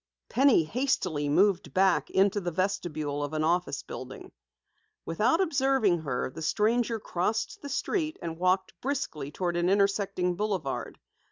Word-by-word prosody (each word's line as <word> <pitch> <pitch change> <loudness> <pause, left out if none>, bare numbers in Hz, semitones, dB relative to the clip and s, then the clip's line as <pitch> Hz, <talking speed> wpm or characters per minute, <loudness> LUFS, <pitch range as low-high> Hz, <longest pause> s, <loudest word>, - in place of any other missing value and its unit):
Penny 260 -8 +4
hastily 170 - -1
moved 180 -2 +2
back 190 -1 +3
into 200 +1 +2
the 175 - -2
vestibule 155 -5 -2
of 145 +1 -4
an 155 0 0
office 175 +3 0
building. - - -9 0.7
Without 215 - +2
observing 270 - +2
her, 130 -4 -3
the 160 - -9
stranger 225 +6 +1
crossed 210 +4 -2
the 285 - -7
street 315 0 -1
and 165 -1 -6
walked 185 +1 +1
briskly 245 - -3
toward 175 +3 -2
an 175 +1 +1
intersecting 195 -2 +1
boulevard. 190 -8 -3
185 Hz, 140 wpm, -28 LUFS, 160-220 Hz, 0.7 s, Penny